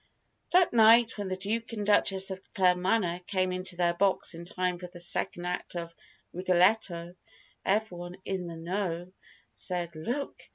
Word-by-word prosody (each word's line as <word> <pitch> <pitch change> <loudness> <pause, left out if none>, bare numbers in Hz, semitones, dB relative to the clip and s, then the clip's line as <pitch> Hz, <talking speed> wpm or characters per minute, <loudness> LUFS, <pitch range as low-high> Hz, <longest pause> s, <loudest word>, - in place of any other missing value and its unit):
That 360 -4 +4
night, 230 0 +6
when 200 - -3
the 185 - -2
Duke 225 +4 -2
and 210 -2 -3
Duchess 195 -2 +3
of 190 0 -6
Claremanagh 180 -1 +2
came 185 -2 0
into 185 0 -1
their 175 -1 +2
box 190 0 +1
in 170 +1 -8
time 180 0 -2
for 180 - -7
the 175 0 -12
second 175 0 0
act 180 0 -3
of 170 -1 -5 0.4
"Rigoletto," 180 -1 +2 0.5
everyone 180 -4 -2
"in 185 -2 -3
the 165 -1 -7
know" 175 0 -3 0.4
said 175 -2 -3
"Look! 245 - -4
185 Hz, 155 wpm, -29 LUFS, 175-200 Hz, 0.5 s, night